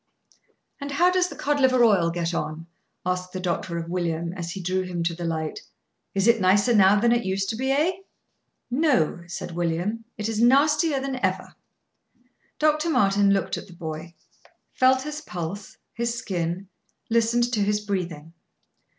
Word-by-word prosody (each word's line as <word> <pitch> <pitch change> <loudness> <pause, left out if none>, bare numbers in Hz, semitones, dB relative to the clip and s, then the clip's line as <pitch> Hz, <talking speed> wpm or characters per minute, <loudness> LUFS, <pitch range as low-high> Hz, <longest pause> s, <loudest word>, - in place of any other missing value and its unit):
"And 280 0 -5
how 345 +6 +3
does 365 0 +2
the - - -9
cod 290 0 0
liver 255 -2 +4
oil 195 -7 +4
get 170 0 -2
on?" 160 0 -3 0.4
asked 180 0 -2
the 185 - -3
doctor 175 -1 -2
of 165 0 -4
William, 170 -1 -2
as 170 -3 -5
he 190 - -5
drew 185 +1 -1
him 180 -2 -3
to 170 0 0
the 170 +1 -5
light. 160 -2 -3 0.6
"It 195 0 +2
is 235 0 +5
nicer 200 +5 +4
now 200 -1 +6
than 235 +2 +3
it 240 0 +2
used 190 0 -1
to - - -2
be, 260 +4 -2
eh?" 300 +6 +3 0.8
"No," 250 - +2
said 175 - -6
William; 175 +7 -2
"it 210 0 -2
is 225 -1 -1
nastier 290 +4 +4
than 265 -1 -4
ever." - - -1 1.0
Dr. 305 +2 +2
Martin 205 -8 +3
looked 195 -1 0
at - - -8
the 180 - -13
boy; 165 0 -7 0.6
felt 260 0 +3
his 300 +1 -5
pulse, 180 - -6 0.2
his 235 0 -2
skin, 180 -2 -3 0.4
listened 235 +1 +2
to 220 - +1
his 210 +1 +1
breathing. 175 -6 -4
200 Hz, 170 wpm, -25 LUFS, 175-250 Hz, 1.0 s, now